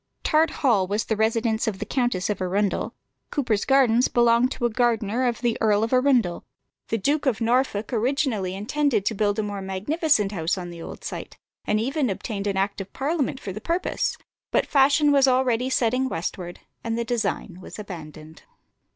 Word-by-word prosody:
Tart 315 +1 +3 0.2
Hall 205 -8 +4
was 205 +2 0
the 220 - 0
residence 220 +1 +1
of 210 -3 -1
the 210 - -4
Countess 240 -6 0
of 205 -3 -2
Arundel: 195 +2 -1 0.4
Cuper's 235 -8 0
Gardens 255 -3 +4
belonged 240 +1 +3
to 240 - -3
a - - +3
gardener 235 0 +1
of 235 -1 -2
the 240 -2 0
Earl 215 -1 +3
of 225 - -1
Arundel. 255 -9 +2 0.4
The 225 - 0
Duke 285 +7 0
of 245 -5 +1
Norfolk 235 -2 0
originally 230 -6 0
intended 225 +1 0
to 220 - +1
build 205 0 0
a 215 - 0
more 205 -1 -4
magnificent 210 - 0
house 170 -2 -1
on 175 -1 -6
the 170 -1 -9
old - - -9
site, - - -7 0.3
and 210 - +1
even 270 +3 0
obtained 200 +1 -4
an 195 -1 -1
act 195 +1 -1
of 195 - -9
Parliament 280 -2 -1
for 195 - -6
the 215 - -7
purpose; 345 - -1 0.3
but - - +2
fashion 285 +1 +4
was 275 -1 +5
already 255 -1 +2
setting 255 +1 +1
westward, 175 0 -5 0.2
and 230 0 -2
the 235 - -1
design 215 -6 -2
was - - -10
abandoned. 160 -6 -9
225 Hz, 185 wpm, -24 LUFS, 200-260 Hz, 0.4 s, was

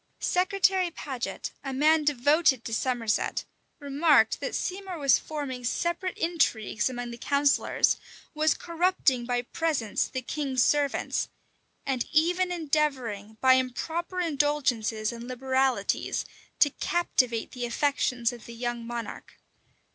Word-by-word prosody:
Secretary 370 0 +2
Paget, 270 -7 -5
a 270 - -4
man 305 +4 +3
devoted 290 -1 +3
to 225 - -4
Somerset, 230 -2 0 0.3
remarked 285 -5 +3
that - - -3
Seymour 375 -1 -3
was 275 -4 +4
forming 280 -5 -5
separate 345 +8 -1
intrigues 245 - 0
among 245 -1 -5
the 235 - -9
counsellors; 280 +1 +2 0.4
was 310 0 +2
corrupting 335 -8 +1
by 245 -1 0
presents 270 -6 -1
the 260 -1 -5
king's 265 -2 0
servants; 290 -2 +1 0.6
and 260 -3 0
even 355 +4 +2
endeavoring, 270 - -1
by 260 0 +7
improper 320 +8 -1
indulgences 275 -9 0
and 235 0 -8
liberalities, 260 +1 0 0.3
to 290 - +5
captivate 255 -11 0
the 245 -1 -4
affections 250 -2 0
of 235 -3 -11
the 235 - -9
young 240 0 -3
monarch. 235 -2 -6
270 Hz, 120 wpm, -27 LUFS, 240-315 Hz, 0.6 s, by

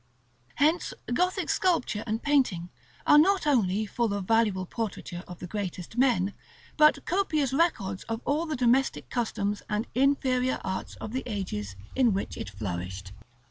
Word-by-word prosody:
Hence 310 +4 +2 0.2
Gothic 360 +7 +1
sculpture 330 - +1
and 220 +1 -2
painting 250 -12 +2 0.4
are 295 - +7
not 385 +2 +4
only 215 -7 +2
full 220 -1 -1
of 200 -2 -3
valuable 210 -4 +2
portraiture 190 -4 -5
of 180 - -9
the - - -7
greatest 185 0 -5
men, 235 -7 +2 0.4
but 305 0 +5
copious 310 -8 +1
records 225 - +1
of 225 0 -3
all 305 +4 0
the 310 - -2
domestic 255 +2 +1
customs 210 -4 -1
and 210 +2 0
inferior 260 -1 +2
arts 190 0 -4
of 215 - -7
the 260 - -1
ages 105 - -4 0.2
in 250 -5 +4
which 195 - -3
it - - -5
flourished. 95 -1 -5
225 Hz, 150 wpm, -28 LUFS, 190-275 Hz, 0.4 s, are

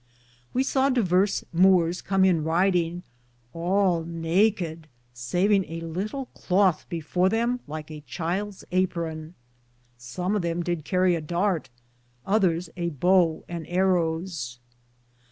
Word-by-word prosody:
We 260 - +1
saw 270 0 +2
diverse 200 -6 +2
Moores 180 -1 +4
com 190 -1 +2
in 170 -5 +3
riding, 175 +1 +1 0.5
all 175 0 +1
naked, 165 0 0 0.3
savinge 180 - +1
a 165 0 -5
litle 195 - -4
clothe 185 -3 +1
before 175 +3 0
them 235 +4 0
like 155 +1 -7
a 150 -1 -8
childe's 185 +8 -4
apron. 170 -3 -2 0.6
Som 180 +11 -3
of 205 - +1
them 170 0 -2
did 170 -3 -3
Carrie 185 0 +2
a 165 - -1
darte, 175 +2 -1 0.6
otheres 185 -4 +1
a 170 -1 -2
bowe 170 +1 +2
and 170 -2 -6
arros. 170 -7 0
175 Hz, 120 wpm, -25 LUFS, 165-190 Hz, 0.6 s, Moores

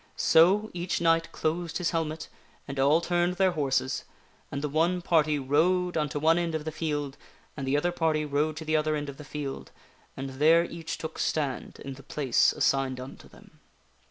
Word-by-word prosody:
So, 195 +7 +4
each 175 0 -2
knight 165 0 +2
closed 165 +1 -2
his 180 -2 -1
helmet, 160 -2 -2 0.4
and 140 -1 -5
all 145 +5 +4
turned 175 +1 0
their 190 0 +3
horses, 135 -4 -1 0.5
and 140 +1 -4
the - - +1
one 170 +4 +1
party 155 -3 +2
rode 175 +7 +1
unto 150 -2 -1
one 160 +3 +3
end 170 -2 -1
of 155 -1 -4
the 155 - -3
field, 150 -3 -3 0.4
and 135 -2 -5
the 140 +2 +2
other 175 +4 +1
party 160 -3 0
rode 150 +2 0
to 160 - -6
the 155 0 +1
other 155 0 +1
end 145 -1 -4
of 135 - -9
the 150 - -9
field, 145 -1 -6 0.5
and 135 0 -5
there 165 +3 +5
each 165 -1 -6
took 160 0 -7
stand 140 -5 -2
in 135 - -5
the 135 - -12
place 135 -2 +2
assigned 135 -2 0
unto 130 +1 -10
them. - - -19
155 Hz, 190 wpm, -28 LUFS, 145-170 Hz, 0.5 s, there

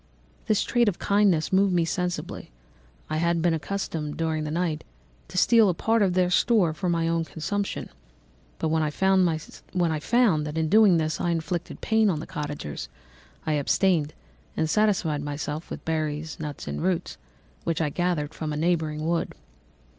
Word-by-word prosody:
"This 215 - +2
trait 240 -3 +2
of 185 - -5
kindness 200 -5 +2
moved 195 0 +4
me 170 -1 +3
sensibly. 180 +1 -3 0.6
I 155 - -2
had 170 +1 +1
been 170 0 +2
accustomed, 160 -3 -3
during 160 -1 -1
the - - -3
night, 165 -1 -1 0.4
to 185 - -8
steal 225 +1 +5
a 180 - 0
part 225 +5 +1
of 185 -3 +2
their 180 -1 +2
store 190 -5 +3
for 180 +3 -2
my 165 -1 +1
own 165 0 +1
consumption, 195 +6 -3 0.7
but 160 - -1
when 160 0 +2
I 155 - +1
found 190 +3 +3
that 160 +1 0
in 160 -1 0
doing 210 -3 +6
this 155 -1 -1
I 175 - 0
inflicted 170 +1 -3
pain 220 -1 +3
on 160 -5 0
the 155 - -6
cottagers, 150 - -5 0.6
I 155 - +1
abstained 155 +1 +1 0.4
and 160 - +1
satisfied 180 -6 +1
myself 145 +2 -4
with - - -7
berries, 155 -1 -2
nuts, 150 -2 -6
and - - -3
roots 175 - -1 0.4
which 165 -1 -1
I 155 -2 +1
gathered 165 -3 -1
from 155 -1 -4
a 150 - -3
neighbouring 155 -2 0
wood. 170 0 -1
165 Hz, 170 wpm, -26 LUFS, 155-185 Hz, 0.7 s, doing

